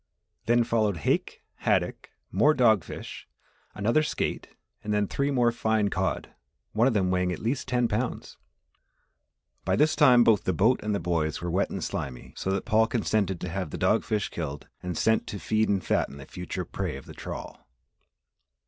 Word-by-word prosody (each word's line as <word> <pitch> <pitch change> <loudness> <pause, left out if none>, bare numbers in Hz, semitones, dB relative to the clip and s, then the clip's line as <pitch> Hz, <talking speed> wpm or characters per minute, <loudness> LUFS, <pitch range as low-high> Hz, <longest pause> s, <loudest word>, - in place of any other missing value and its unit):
Then 120 +1 +4
followed 110 -5 +1
hake, 75 - -1
haddock, - - 0 0.2
more 130 +11 +4
dog 110 - +4
fish, - - -8 0.5
another 115 +9 +2
skate, 155 - -2 0.4
and 105 - -3
then 105 0 +2
three 140 +7 -1
more 120 -4 +3
fine 110 -3 +1
cod 95 0 -1 0.4
one 115 +4 +3
of 125 - +1
them 95 -3 +2
weighing 90 0 +1
at 90 - -3
least 125 +5 -2
ten 125 -1 +2
pounds. 115 +3 -3 1.3
By - - +1
this 155 +1 +3
time 125 -6 +6
both 105 -6 +4
the 95 - +1
boat 110 +10 +3
and 105 -1 -1
the - - -1
boys 80 -2 -1
were 85 0 -3
wet 95 +3 +1
and - - -4
slimy 60 -2 -5
so - - -3
that 95 0 -1
Paul 110 -1 +3
consented 105 -6 0
to 90 - -3
have 90 -2 -3
the - - -5
dog - - +2
fish 105 -2 -1
killed 75 -4 -5
and 90 -2 -4
sent 110 0 +2
to 105 - -5
feed 110 +2 +1
and 100 -2 0
fatten 70 - 0
the 70 - -10
future 90 +4 -5
prey 65 - -4
of 70 - -12
the - - -11
trawl. 65 - -8
105 Hz, 185 wpm, -27 LUFS, 90-115 Hz, 1.3 s, time